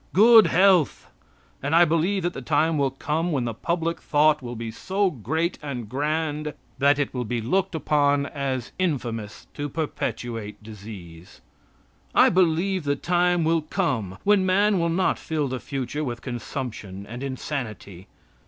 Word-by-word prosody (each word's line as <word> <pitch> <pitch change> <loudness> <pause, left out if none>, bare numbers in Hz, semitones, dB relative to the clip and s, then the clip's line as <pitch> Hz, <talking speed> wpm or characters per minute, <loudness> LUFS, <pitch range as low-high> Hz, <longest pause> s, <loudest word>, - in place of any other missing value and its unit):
Good 225 +2 +8
health! 185 -4 +3 0.5
And 145 +4 0
I 175 +1 +7
believe 170 +4 +1
that 175 0 -1
the - - -6
time 155 +5 +1
will 140 -1 +2
come 155 +6 -2
when 135 -5 0
the 115 - -2
public 170 +7 -2
thought 150 0 +3
will 120 -1 -6
be 115 0 -5
so 190 - 0
great 160 - -2
and 130 -6 -5
grand 150 +3 -2 0.2
that 140 0 +4
it 145 -2 -1
will 125 -1 -2
be 120 +1 -2
looked 185 - 0
upon 145 -2 +2
as 135 -4 -3
infamous 120 - -2
to 145 0 -4
perpetuate 120 -8 -4
disease. 95 -6 -11 0.8
I - - +7
believe 185 +1 +2
the 145 -1 0
time 175 +2 +1
will 165 0 +2
come 125 - -2
when 205 -1 +4
man 195 +1 +3
will 170 0 +1
not 180 +3 +1
fill 155 -3 -2
the 130 0 -4
future 140 +3 -4
with 120 -4 -5
consumption 115 -6 -6
and 120 +4 -8
insanity. 125 - -5
145 Hz, 155 wpm, -24 LUFS, 120-170 Hz, 0.8 s, Good